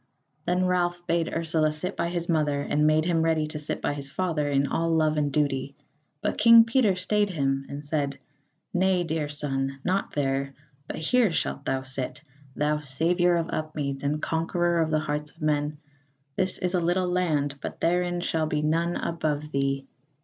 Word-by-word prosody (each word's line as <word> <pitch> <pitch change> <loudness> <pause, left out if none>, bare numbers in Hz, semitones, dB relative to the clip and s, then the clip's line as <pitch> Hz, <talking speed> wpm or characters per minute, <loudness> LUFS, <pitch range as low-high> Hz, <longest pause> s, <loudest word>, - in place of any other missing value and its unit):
Then 180 +1 +1
Ralph 175 -1 0
bade 170 -1 0
Ursula 160 -2 +1
sit 165 +6 -4
by 170 - -1
his 170 -1 -3
mother, 150 -4 +1
and 150 +1 +2
made 155 +1 +3
him 165 -2 +2
ready 160 -1 +2
to 150 0 -5
sit 150 - -4
by - - +1
his 140 -1 -7
father 160 -2 -1
in 140 0 +2
all 165 +3 0
love 155 -1 +2
and 145 -1 0
duty. 140 -1 0 0.5
But - - -1
King 230 +1 +9
Peter 230 -4 +3
stayed 205 +3 +1
him 135 -5 -1
and 145 +1 -7
said: 145 -2 -1 0.6
"Nay, 185 0 +2
dear 160 -3 -2
son, 135 -2 -2
not 190 +2 -1
there, 135 -1 -1 0.3
but - - -5
here 220 +6 +3
shalt - - -2
thou 135 0 -1
sit, 135 +2 -3 0.3
thou 150 +1 +1
saviour 170 +5 +2
of 170 0 -1
Upmeads 145 -3 -3
and 145 +2 -1
conqueror 170 +1 +1
of 160 - +1
the 155 -1 +1
hearts 150 0 -3
of - - -21
men; 150 0 0 0.6
this 185 -1 0
is 180 0 -2
a 180 - +3
little 175 +2 +1
land, 150 -6 0
but - - -6
therein 175 +1 +1
shall 160 -2 0
be 150 -1 -1
none 165 +3 +1
above 150 -2 -2
thee." 135 -1 0
155 Hz, 185 wpm, -26 LUFS, 145-175 Hz, 0.6 s, King